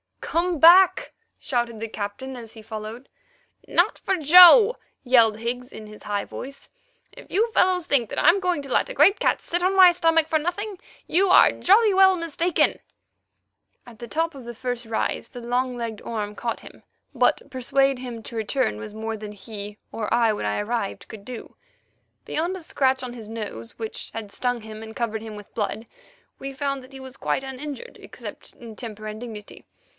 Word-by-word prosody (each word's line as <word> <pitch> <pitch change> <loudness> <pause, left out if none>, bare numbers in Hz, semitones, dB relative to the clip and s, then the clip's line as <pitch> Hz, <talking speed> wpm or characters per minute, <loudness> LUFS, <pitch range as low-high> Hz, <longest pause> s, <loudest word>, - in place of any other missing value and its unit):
"Come 340 -1 -1
back," 355 +4 +6 0.3
shouted 240 -4 -2
the 225 - -4
Captain 215 +6 -6
as 225 -2 -10
he 225 - -12
followed. 220 +3 -8 0.6
"Not - - +2
for 385 - 0
Joe!" 360 - +8 0.3
yelled 230 -4 +4
Higgs 245 +2 -4
in 215 - -10
his 210 0 -13
high 205 -1 -2
voice. 275 +1 -9 0.4
"If - - -15
you 450 +5 +1
fellows 365 -4 +2
think 245 -9 +1
that - - -6
I'm 340 +6 +5
going 360 -5 -1
to 275 -2 -10
let - - +2
a - - -6
great 345 +9 +4
cat - - +1
sit 350 +1 -2
on 375 +2 +1
my 370 -2 +8
stomach 330 -2 +2
for 315 -1 +1
nothing, 370 +5 -4 0.3
you 380 +4 +2
are 360 - +7
jolly 415 +2 +4
well 380 0 +6
mistaken." 335 0 0 1.1
At 230 -3 -15
the 235 - -8
top 325 +5 -1
of 265 -3 -11
the 240 0 -8
first 245 0 -4
rise 225 0 -2
the 245 - -10
long 250 +1 -1
legged 230 -3 -5
Orme 210 -3 -4
caught 230 +2 -4
him, - - -14 0.3
but 255 +2 +1
persuade 270 +1 +1
him 240 -3 -7
to 235 - -9
return 220 - -1
was 110 - -8
more 220 +1 -4
than 210 0 -8
he, 205 0 -8
or 215 -2 -4
I 230 -2 +3
when 210 - -3
I 105 0 -1
arrived, 220 -1 -4
could 205 -2 -11
do. 250 -2 -9 0.7
Beyond 345 +4 -2
a 370 - -9
scratch 265 -4 0
on 245 -1 -6
his 225 -3 -10
nose, 205 - -7
which 220 -1 -6
had 215 -3 -7
stung 245 +1 -2
him 215 0 -9
and 220 0 -10
covered 225 -2 -2
him 220 -1 -8
with 205 -1 -12
blood, 220 +1 -3 0.5
we 275 0 -6
found 275 0 -3
that 260 +2 -16
he 265 - -9
was 260 0 -10
quite - - -1
uninjured, 285 - -7
except - - -10
in 225 -3 -12
temper 215 -3 -8
and 215 0 -6
dignity. 220 -3 -10
245 Hz, 190 wpm, -24 LUFS, 220-320 Hz, 1.1 s, Joe